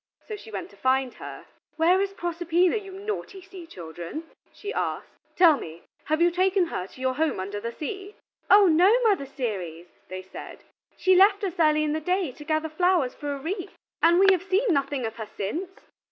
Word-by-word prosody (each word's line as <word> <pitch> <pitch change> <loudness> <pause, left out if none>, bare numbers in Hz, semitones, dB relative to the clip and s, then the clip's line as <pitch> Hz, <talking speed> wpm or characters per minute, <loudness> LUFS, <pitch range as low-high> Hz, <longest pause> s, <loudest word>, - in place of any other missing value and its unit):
So 430 - -4
she 405 - -12
went 200 -3 -6
to - - -17
find 260 +4 +1
her. - - -9 0.3
"Where 350 +4 +4
is 395 0 -2
Proserpina, 345 +1 +1
you 395 -3 -5
naughty 395 0 -5
sea 375 -2 -12
children?" 175 - -7 0.3
she 420 +1 -7
asked; - - -3 0.2
"tell 335 -5 +6
me, 165 -7 -9 0.2
have 310 0 0
you 345 - +4
taken 370 +1 +2
her 185 - -4
to 255 - -17
your 260 0 +1
home 310 -4 0
under 200 +2 -4
the 230 +2 -4
sea?" 390 - -6 0.3
"Oh 405 0 +8
no, 355 +3 +5
Mother 395 -11 +2
Ceres," 190 - -4 0.2
they 185 0 -7
said, 190 - -10 0.3
"she 375 - +4
left 400 +2 +5
us 380 -4 -1
early 305 -1 +4
in 300 -1 0
the 315 - -2
day 360 -2 0
to 295 - -12
gather 310 +1 0
flowers 340 -4 +2
for 290 -1 -5
a 280 - -3
wreath, 360 +7 -5 0.2
and 340 +1 +5
we 385 - +6
have 370 -3 +2
seen 390 +2 +1
nothing 275 -3 -1
of 225 0 -5
her 220 -2 -6
since." 315 - -3
320 Hz, 200 wpm, -26 LUFS, 260-375 Hz, 0.3 s, Oh